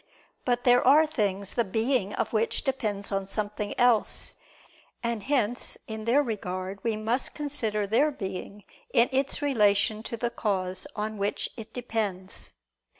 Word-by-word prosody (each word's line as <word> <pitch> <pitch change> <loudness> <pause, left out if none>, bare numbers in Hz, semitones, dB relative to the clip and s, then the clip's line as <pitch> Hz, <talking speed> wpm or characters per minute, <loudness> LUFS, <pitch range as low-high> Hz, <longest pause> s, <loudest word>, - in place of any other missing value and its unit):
But 245 -1 +1
there 245 0 +6
are 300 +4 +7
things 200 -9 -1
the 235 - +2
being 220 +1 0
of - - -2
which 220 +1 +1
depends 210 -7 -2
on 195 -1 -1
something 210 0 -3
else, 245 -3 +2 0.7
and 235 -2 -1
hence 245 -2 0
in 220 -1 -5
their 265 +5 +4
regard 195 -4 -4
we 230 -2 +1
must 230 +4 0
consider 230 -8 -1
their 230 +9 +3
being 200 -4 -6 0.3
in 240 - +5
its 270 +2 0
relation 210 -5 +3
to 230 +1 -5
the 235 +1 -1
cause 190 +1 -1
on 215 0 -3
which 200 +1 -1
it 225 -3 -9
depends. 215 -6 -3
220 Hz, 150 wpm, -28 LUFS, 200-245 Hz, 0.7 s, are